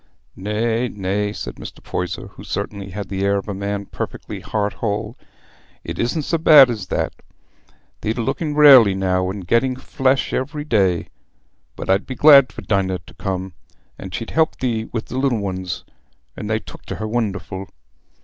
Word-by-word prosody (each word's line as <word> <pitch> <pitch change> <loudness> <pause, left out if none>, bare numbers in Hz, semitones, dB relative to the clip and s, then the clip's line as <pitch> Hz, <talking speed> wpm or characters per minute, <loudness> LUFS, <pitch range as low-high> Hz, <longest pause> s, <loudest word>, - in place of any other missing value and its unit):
"Nay, 110 +4 -1
nay," 100 +1 -2
said - - -6
Mr. - - -10
Poyser, 90 -1 -4
who - - -13
certainly 100 -2 -4
had 100 +1 -5
the 95 +1 -3
air 100 0 +2
of 100 - -5
a 105 - -3
man 100 +1 -3
perfectly - - -6
heart 105 -1 -2
whole, 105 +1 -3 0.7
"it - - -6
isna 120 +6 0
so 165 +3 0
bad 150 -5 +8
as 105 -5 -5
that. - - -1 0.9
Thee't 110 +3 -2
looking 145 +6 -2
rarely 135 -9 +8
now, 95 -1 0
and 95 -1 -6
getting 120 +7 +2
flesh 130 +1 0
every 145 +3 -2
day. 95 - +1 0.7
But - - -7
I'd 95 +2 +2
be 130 - -5
glad 140 -2 +7
for - - -9
Dinah 95 -3 0
t' - - -15
come, 95 -1 -3 0.5
for - - -6
she'd 115 +6 -5
help 160 -1 +2
thee 115 -3 -1
wi' 115 - -3
the 125 +3 -5
little 120 -7 +1
uns: 95 -2 -4 0.5
they 110 +1 -1
took - - -11
t' - - -4
her 110 - -4
wonderful." 100 -4 -3
105 Hz, 170 wpm, -21 LUFS, 95-125 Hz, 0.9 s, bad